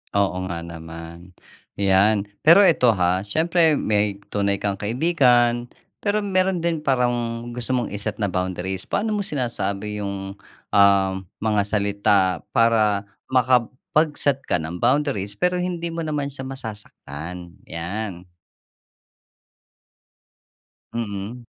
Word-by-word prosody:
Oo 95 Hz, -2 st, +1 dB
nga 90 Hz, -2 st, -4 dB
naman, 85 Hz, +1 st, -9 dB, 0.5 s
‘yan. 100 Hz, +1 st, +3 dB, 0.2 s
Pero 165 Hz, +5 st, +8 dB
eto, 125 Hz, -8 st, +4 dB
ha, 90 Hz, -1 st, +1 dB
siyempre, 160 Hz, -, +2 dB
may 105 Hz, -1 st, 0 dB
tunay 100 Hz, -1 st, 0 dB
kang 100 Hz, -1 st, -1 dB
kaibigan, 120 Hz, -, +2 dB, 0.3 s
pero 210 Hz, 0 st, +1 dB
meron 190 Hz, -2 st, +1 dB
din 165 Hz, -2 st, -1 dB
parang 120 Hz, -3 st, 0 dB
gusto 125 Hz, +1 st, -4 dB
mong 125 Hz, -3 st, +1 dB
i-set 105 Hz, +1 st, -4 dB
na 100 Hz, -, +1 dB
boundaries. 95 Hz, 0 st, -3 dB
Paano 215 Hz, 0 st, -1 dB
mo 205 Hz, -, -1 dB
sinasabi 105 Hz, -, -3 dB
‘yong, 100 Hz, 0 st, -5 dB, 0.4 s
ah, 100 Hz, -1 st, +5 dB, 0.2 s
mga 105 Hz, -1 st, +1 dB
salita 100 Hz, 0 st, +2 dB, 0.3 s
para 110 Hz, -4 st, +3 dB, 0.2 s
makapag-set 130 Hz, +3 st, +1 dB
ng 85 Hz, +4 st, -2 dB
boundaries, 120 Hz, -7 st, +1 dB
pero 180 Hz, 0 st, +2 dB
hindi 180 Hz, -1 st, -2 dB
mo 165 Hz, 0 st, -4 dB
naman 150 Hz, -2 st, -2 dB
siya 140 Hz, -1 st, -7 dB
masasaktan? 90 Hz, -, -8 dB
'Yan. 90 Hz, +2 st, -5 dB, 2.7 s
Mm. 110 Hz, +1 st, -4 dB
110 Hz, 110 wpm, -23 LUFS, 100-135 Hz, 2.7 s, Pero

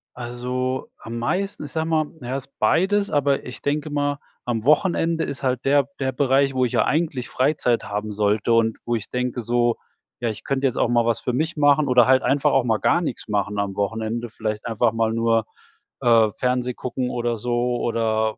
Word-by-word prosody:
Also, 125 Hz, +2 st, -3 dB
am 115 Hz, +1 st, -7 dB
meisten, 185 Hz, +7 st, -2 dB
ich 145 Hz, -, -8 dB
sag 160 Hz, 0 st, -1 dB
mal, 160 Hz, -1 st, +1 dB, 0.2 s
ja, 125 Hz, +2 st, -4 dB
ist 135 Hz, 0 st, -7 dB
beides, 190 Hz, -, +2 dB
aber 140 Hz, -1 st, +1 dB
ich 125 Hz, -, -7 dB
denke 150 Hz, +1 st, -1 dB
mal, 145 Hz, 0 st, -1 dB, 0.3 s
am 115 Hz, -3 st, -2 dB
Wochenende 165 Hz, +3 st, +2 dB
ist 140 Hz, -, -5 dB
halt 130 Hz, 0 st, 0 dB
der 140 Hz, +1 st, +3 dB
der 130 Hz, -1 st, 0 dB
Bereich, 135 Hz, 0 st, +2 dB
wo 130 Hz, -, +2 dB
ich 120 Hz, -, -2 dB
ja -, -, +2 dB
eigentlich 150 Hz, -6 st, -1 dB
Freizeit 130 Hz, -3 st, +1 dB
haben 105 Hz, +1 st, -4 dB
sollte 105 Hz, +2 st, +1 dB
und 115 Hz, -1 st, +2 dB
wo 120 Hz, -, 0 dB
ich 110 Hz, -2 st, -5 dB
denke 125 Hz, -1 st, -2 dB
so: 120 Hz, 0 st, +1 dB, 0.5 s
„Ja, 120 Hz, -, 0 dB
ich 110 Hz, 0 st, -6 dB
könnte 135 Hz, 0 st, 0 dB
jetzt 125 Hz, -, -3 dB
auch -, -, +2 dB
mal 120 Hz, -1 st, +3 dB
was 115 Hz, -1 st, +1 dB
für 125 Hz, -, -2 dB
mich 155 Hz, +6 st, -1 dB
machen 145 Hz, 0 st, +4 dB
oder 125 Hz, -1 st, +5 dB
halt 130 Hz, 0 st, +4 dB
einfach 140 Hz, 0 st, +2 dB
auch 135 Hz, -, +3 dB
mal 115 Hz, -3 st, +1 dB
gar 170 Hz, -, +2 dB
nix 155 Hz, -8 st, -4 dB
machen 105 Hz, -1 st, -1 dB
am 100 Hz, -1 st, -2 dB
Wochenende.“ 110 Hz, +3 st, -2 dB
Vielleicht 110 Hz, -1 st, -4 dB
einfach 115 Hz, 0 st, +1 dB
mal 115 Hz, -1 st, +1 dB
nur, 115 Hz, -1 st, +2 dB, 0.6 s
äh, 115 Hz, -3 st, +5 dB
Fernseh 125 Hz, 0 st, 0 dB
gucken 125 Hz, +1 st, -3 dB
oder 120 Hz, -1 st, -1 dB
so 120 Hz, +2 st, -1 dB
oder 110 Hz, -1 st, 0 dB
125 Hz, 205 wpm, -23 LUFS, 115-140 Hz, 0.6 s, oder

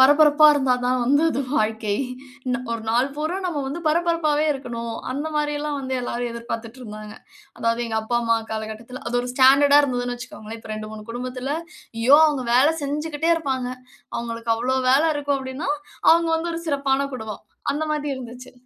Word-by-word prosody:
"பரபரப்பா 295 Hz, +2 st, +7 dB
இருந்தா 270 Hz, -3 st, +2 dB
தான் 250 Hz, 0 st, +1 dB
வந்து 285 Hz, +5 st, +3 dB
அது 275 Hz, -, -1 dB, 0.2 s
வாழ்க்கை. 215 Hz, -1 st, 0 dB, 0.6 s
ந -, -, +2 dB, 0.2 s
ஒரு 230 Hz, -1 st, -3 dB
நாள் 245 Hz, +4 st, +2 dB
பூரா 310 Hz, +4 st, -2 dB
நம்ம 310 Hz, -5 st, -2 dB
வந்து 285 Hz, +6 st, -4 dB
பரபரப்பாவே 315 Hz, -2 st, +2 dB
இருக்கணும்." 235 Hz, -4 st, -5 dB, 0.2 s
அந்த 285 Hz, +4 st, -3 dB
மாரில்லாம் 295 Hz, -1 st, -1 dB
வந்து 260 Hz, 0 st, -3 dB
எல்லாரும் 245 Hz, 0 st, -3 dB
எதிர்பார்த்துட்டிருந்தாங்க. 230 Hz, -2 st, -7 dB, 0.4 s
அதாவது 230 Hz, +1 st, 0 dB
எங்க 220 Hz, -1 st, -1 dB
அப்பா, 235 Hz, +2 st, 0 dB
அம்மா 230 Hz, 0 st, +3 dB, 0.2 s
காலகட்டத்தில, 220 Hz, +3 st, -6 dB
அது 245 Hz, -, 0 dB
ஒரு 245 Hz, -, -5 dB
ஸ்டாண்டர்டா 280 Hz, +2 st, +7 dB
இருந்ததுன்னு 245 Hz, -3 st, -1 dB
வச்சுக்கோங்களேன். 225 Hz, -2 st, -9 dB
இப்ப 220 Hz, -, -10 dB
2 215 Hz, 0 st, -6 dB
3 215 Hz, -1 st, -8 dB
குடும்பத்தில, 255 Hz, +4 st, -3 dB, 0.4 s
"ஐயோ! 255 Hz, +5 st, +6 dB
அவங்க 275 Hz, -4 st, -2 dB
வேலை 275 Hz, +6 st, +5 dB
செஞ்சுகிட்டே 300 Hz, +3 st, -1 dB
இருப்பாங்க." 265 Hz, -6 st, -2 dB, 0.5 s
அவங்களுக்கு 230 Hz, 0 st, -2 dB
அவ்வளோ 250 Hz, +3 st, 0 dB
வேலை 285 Hz, +5 st, +5 dB
இருக்கும், 285 Hz, -1 st, 0 dB
அப்படீன்னா, 265 Hz, +2 st, -4 dB, 0.4 s
அவங்க 335 Hz, 0 st, +4 dB
வந்து 335 Hz, +1 st, -2 dB
ஒரு 330 Hz, -, -4 dB
சிறப்பான 275 Hz, -1 st, +1 dB
குடும்பம். 220 Hz, -4 st, -7 dB, 0.3 s
அந்த 300 Hz, +2 st, -1 dB
மாதிரி 295 Hz, -1 st, -2 dB
இருந்துச்சு. 250 Hz, 0 st, -9 dB
260 Hz, 165 wpm, -23 LUFS, 235-290 Hz, 0.6 s, பரபரப்பா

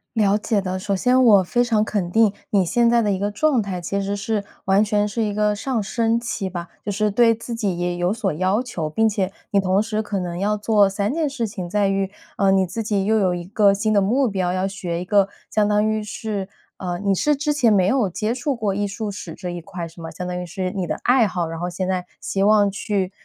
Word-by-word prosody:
了 205 Hz, -1 st, +3 dB
解 210 Hz, -1 st, 0 dB
的。 185 Hz, -1 st, -3 dB
首 200 Hz, +1 st, -1 dB
先 250 Hz, +6 st, +3 dB
我 205 Hz, -5 st, +6 dB
非 240 Hz, +7 st, +1 dB
常 220 Hz, -3 st, +2 dB
肯 185 Hz, -5 st, -2 dB
定 220 Hz, -1 st, +4 dB, 0.2 s
你 195 Hz, -3 st, +2 dB
现 235 Hz, +6 st, +3 dB
在 235 Hz, 0 st, +4 dB
的 205 Hz, -2 st, +1 dB
一 190 Hz, -, -1 dB
个 205 Hz, +1 st, 0 dB
状 265 Hz, +1 st, +2 dB
态， 190 Hz, -3 st, -4 dB
其 200 Hz, +3 st, -2 dB
实 200 Hz, +1 st, -2 dB
是 205 Hz, 0 st, -2 dB, 0.2 s
完 195 Hz, +2 st, +4 dB
全 210 Hz, 0 st, +1 dB
是 225 Hz, +2 st, -2 dB
一 205 Hz, -1 st, -1 dB
个 210 Hz, 0 st, +1 dB
上 240 Hz, +1 st, -2 dB
升 230 Hz, +2 st, +1 dB
期 230 Hz, -5 st, -3 dB
吧， 175 Hz, -1 st, -6 dB
就 205 Hz, -, -3 dB
是 210 Hz, +1 st, 0 dB
对 230 Hz, +2 st, +4 dB
自 230 Hz, +1 st, -7 dB
己 200 Hz, -6 st, -1 dB
也 175 Hz, 0 st, -1 dB
有 175 Hz, +2 st, +1 dB
所 215 Hz, -5 st, -1 dB
要 185 Hz, +7 st, +1 dB
求。 165 Hz, -11 st, -4 dB
并 225 Hz, +8 st, +2 dB
且 195 Hz, -3 st, -1 dB, 0.2 s
你 200 Hz, -, +4 dB
同 190 Hz, +1 st, +2 dB
时 215 Hz, 0 st, -2 dB
可 205 Hz, -2 st, -3 dB
能 175 Hz, -1 st, -4 dB
要 210 Hz, +1 st, +1 dB
做 205 Hz, -2 st, +3 dB
3 200 Hz, +5 st, -1 dB
件 315 Hz, -3 st, 0 dB
事 235 Hz, -5 st, -2 dB
情， 185 Hz, -5 st, -6 dB
在 205 Hz, 0 st, +2 dB
于， 195 Hz, 0 st, 0 dB, 0.3 s
呃， 195 Hz, -1 st, +3 dB
你 190 Hz, -1 st, +3 dB
自 225 Hz, +6 st, -4 dB
己 200 Hz, -2 st, 0 dB
又 220 Hz, +1 st, +3 dB
有 185 Hz, -3 st, +2 dB
一 175 Hz, -, -5 dB
个 200 Hz, +1 st, +3 dB
新 215 Hz, +2 st, 0 dB
的 200 Hz, -, +4 dB
目 250 Hz, +7 st, +2 dB
标， 185 Hz, -2 st, -1 dB
要 185 Hz, +1 st, 0 dB
学 180 Hz, -3 st, -4 dB
一 -, -, -5 dB
个 200 Hz, 0 st, +3 dB, 0.2 s
相 210 Hz, -1 st, +2 dB
当 210 Hz, +1 st, +2 dB
于 215 Hz, 0 st, -1 dB
是 210 Hz, -2 st, -4 dB, 0.3 s
呃， 175 Hz, -2 st, -3 dB
你 200 Hz, -1 st, +1 dB
是 295 Hz, +10 st, +2 dB
之 295 Hz, +1 st, 0 dB
前 245 Hz, -7 st, +3 dB
没 190 Hz, -3 st, +4 dB
有 215 Hz, -2 st, +2 dB
接 215 Hz, +6 st, -2 dB
触 260 Hz, +2 st, -2 dB
过 210 Hz, -4 st, -1 dB
艺 205 Hz, +1 st, -1 dB
术 210 Hz, +1 st, -4 dB
史 180 Hz, -4 st, -7 dB
这 180 Hz, -2 st, -6 dB
一 175 Hz, -1 st, -5 dB
块 175 Hz, -2 st, -6 dB
是 165 Hz, +1 st, -13 dB
吗？ 165 Hz, -, -6 dB
相 180 Hz, -, -6 dB
当 180 Hz, 0 st, -3 dB
于 -, -, -5 dB
是 185 Hz, +2 st, -3 dB
你 190 Hz, -4 st, -3 dB
的 -, -, -1 dB
爱 245 Hz, -3 st, +4 dB
好， 175 Hz, -3 st, -2 dB
然 165 Hz, 0 st, -6 dB
后 175 Hz, +1 st, -2 dB
现 185 Hz, +1 st, -3 dB
在 185 Hz, -1 st, -1 dB
希 195 Hz, -, -2 dB
望 205 Hz, -1 st, +5 dB
去， 200 Hz, -1 st, -2 dB
200 Hz, 275 characters per minute, -22 LUFS, 185-220 Hz, 0.3 s, 我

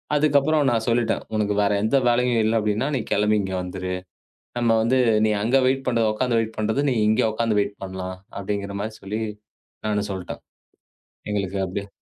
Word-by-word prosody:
அதுக்கப்புறம் 145 Hz, 0 st, +3 dB
நான் 115 Hz, -1 st, 0 dB
சொல்லிவிட்டேன். 115 Hz, 0 st, +1 dB
உனக்கு 105 Hz, -1 st, +1 dB
வேறு 100 Hz, 0 st, +2 dB
எந்த 110 Hz, +6 st, +3 dB
வேலையும் 120 Hz, 0 st, +2 dB
இல்லை 110 Hz, +1 st, +1 dB
அப்படி 105 Hz, -1 st, 0 dB
என்றால், 140 Hz, +5 st, 0 dB
நீ -, -, -1 dB
கிளம்பி 105 Hz, +1 st, +3 dB
இங்கே 95 Hz, -1 st, -3 dB
வந்துவிடு. 90 Hz, 0 st, -4 dB, 0.7 s
நம்ம 120 Hz, -1 st, +2 dB
வந்து 130 Hz, +3 st, +2 dB, 0.3 s
நீ 110 Hz, -, +2 dB
அங்கே 130 Hz, +5 st, +3 dB
வெயிட் 135 Hz, +1 st, +1 dB
பண்ற, 120 Hz, -2 st, +1 dB
உட்கார்ந்து 120 Hz, +1 st, +1 dB
வெயிட் 110 Hz, 0 st, -4 dB
பண்றதை 110 Hz, +6 st, 0 dB
நீ -, -, +1 dB
இங்கே 110 Hz, +1 st, +3 dB
உட்கார்ந்து 110 Hz, -1 st, 0 dB
வெயிட் 100 Hz, 0 st, -3 dB
பண்ணலாம் 95 Hz, -1 st, -5 dB, 0.2 s
அப்படி 100 Hz, +1 st, -2 dB
என்கிற 100 Hz, 0 st, -6 dB
மாதிரி 110 Hz, +1 st, -6 dB
சொல்லி 105 Hz, +3 st, -3 dB, 0.7 s
நானும் 105 Hz, -1 st, 0 dB
சொல்லிவிட்டேன். 95 Hz, -2 st, -6 dB, 0.9 s
எங்களுக்கு 100 Hz, -1 st, -2 dB
அப்படியே 100 Hz, +2 st, -5 dB
110 Hz, 180 wpm, -23 LUFS, 100-120 Hz, 0.9 s, அதுக்கப்புறம்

